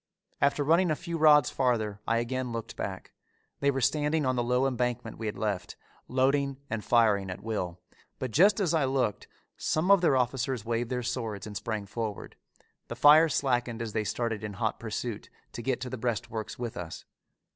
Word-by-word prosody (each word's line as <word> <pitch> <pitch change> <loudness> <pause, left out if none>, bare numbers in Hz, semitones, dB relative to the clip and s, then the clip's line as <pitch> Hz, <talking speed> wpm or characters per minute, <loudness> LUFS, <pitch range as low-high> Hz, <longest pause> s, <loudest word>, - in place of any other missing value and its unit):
After 140 +1 +3
running 165 +5 +3
a 155 - +2
few 170 +2 -5
rods 150 -4 +6
farther 110 -6 0
I 115 - +2
again 125 +1 -2
looked 115 -1 -5
back. 95 -1 -5 0.5
They 140 - +2
were 135 -1 0
standing 150 +3 +1
on 130 0 +1
the 120 - +1
low 125 +2 +2
embankment 125 -3 -2
we 110 - -3
had 105 - -4
left, 100 -7 -2 0.3
loading 135 +1 +1
and 110 -1 -2
firing 105 -5 +3
at 90 - -7
will, 90 -6 -3 0.4
but 130 -2 -4
just 195 - +5
as 180 -5 +1
I 160 -3 +3
looked 130 -6 -1 0.3
some 165 +5 +1
of 200 -3 +6
their 145 -6 +4
officers 125 -2 -1
waved 115 0 -1
their 125 -1 -2
swords 115 -4 -3
and 105 -1 -8
sprang 110 -1 -3
forward. 110 0 -5 0.5
The - - -5
fire 155 +3 +7
slackened 125 -5 0
as 115 -2 -4
they 110 - 0
started 115 0 -2
in 105 -1 -4
hot 110 +1 -2
pursuit 115 0 -5 0.2
to - - -6
get 130 +1 -1
to 125 - -4
the 130 - -5
breastworks 110 -2 -3
with 120 -2 -5
us. 85 -1 -7
120 Hz, 190 wpm, -29 LUFS, 110-135 Hz, 0.5 s, fire